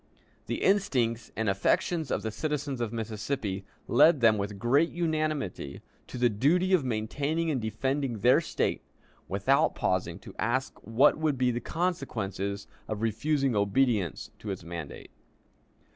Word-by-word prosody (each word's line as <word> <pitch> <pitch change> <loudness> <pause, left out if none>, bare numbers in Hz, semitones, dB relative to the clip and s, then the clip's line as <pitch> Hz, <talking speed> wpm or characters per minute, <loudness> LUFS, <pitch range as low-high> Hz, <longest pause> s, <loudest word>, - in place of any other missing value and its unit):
The - - -2
instincts 130 - +1
and 110 0 -1
affections 135 - +1
of - - -1
the 110 - -2
citizens 140 +1 -3
of 115 -3 -1
Mississippi 110 -3 -3 0.2
led 150 +5 +6
them 110 -3 +4
with 100 0 -3
great 135 +10 +3
unanimity 155 - -2 0.2
to - - -7
the 120 0 +4
duty 160 - +2
of 175 -6 +4
maintaining 140 +8 -1
and 130 -5 -1
defending 130 +3 -1
their 125 +9 +5
State, - - -1 0.5
without - - +2
pausing - - -1
to - - -11
ask 130 +3 -1
what 130 +8 +3
would 155 -3 +1
be 125 0 +2
the 120 - -2
consequences 110 - -2 0.2
of 110 0 -3
refusing 135 +3 +1
obedience 100 - +1
to 105 - -7
its 95 -2 -4
mandate. 85 -3 -7
120 Hz, 145 wpm, -29 LUFS, 110-150 Hz, 0.5 s, led